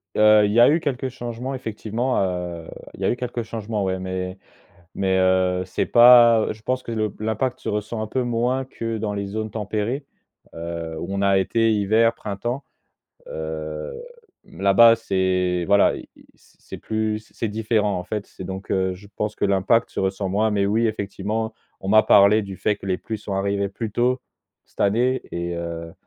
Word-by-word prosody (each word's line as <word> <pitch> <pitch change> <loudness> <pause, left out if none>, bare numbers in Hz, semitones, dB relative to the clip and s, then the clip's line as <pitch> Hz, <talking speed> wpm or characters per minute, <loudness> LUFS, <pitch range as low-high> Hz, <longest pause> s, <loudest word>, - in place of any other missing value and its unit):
Heu, 105 0 +6
il 105 - 0
y 115 - +3
a 120 - +8
eu 160 +3 +3
quelques 135 -3 -2
changements 120 +1 -5
effectivement, 115 0 -2
heu, 90 -3 -3 0.3
il - - -13
y - - 0
eu - - +1
quelques 120 -1 -4
changements 110 -2 -4
ouais, 95 -1 -1
mais 95 0 -4 0.6
mais 95 -1 +1
heu, 95 0 +2
c'est 90 - -1
pas 120 -2 +7
je 110 0 -16
pense 130 +2 -1
que 115 - -6
le 110 -2 -1
l'impact 110 +4 -2
se - - -6
ressent 105 +2 -3
un 110 - -2
peu 130 +4 -1
moins 120 +2 0
que 115 -3 -5
dans 105 -1 -2
les 100 -1 -3
zones 110 +2 -4
tempérées, 110 +6 -3 0.5
heu, 85 -1 -5
où - - -5
on 100 0 -2
a 100 -1 +4
été, 115 +4 +2
hiver, 110 +3 +3
printemps. 120 +7 -4 0.6
Heu, 80 -1 -5 0.5
là-bas, 100 +6 +5
c'est 95 -4 0
voilà, 100 0 +4
i - - -10
i - - -19
c'est - - -13
plus 110 0 -3
c'est 115 - -2
différent 105 -2 0
en 90 - -6
fait. 105 +2 -4
C'est 95 - -10
donc 95 +1 -7
heu 95 -1 +1
je 95 +3 -14
pense 105 0 -2
que - - -1
l'impact 100 +4 +2
se - - -4
ressent 95 0 -1
moins, 110 +3 +1
mais 100 -2 +1
oui, 110 +4 +2
effectivement, 110 +1 -3 0.3
on 95 - -6
m'a 110 +2 +6
parlé 100 +1 +6
du 100 -2 -7
fait 105 +2 0
que 100 - -11
les 95 -1 0
pluies 110 +3 -6
sont 100 -1 -5
arrivées 100 +1 0
plus 110 +3 -5
tôt 125 +4 0 0.4
cette - - -16
année 120 +6 +2
et 85 0 -3
heu, 85 -1 -5
105 Hz, 190 wpm, -23 LUFS, 95-115 Hz, 0.6 s, a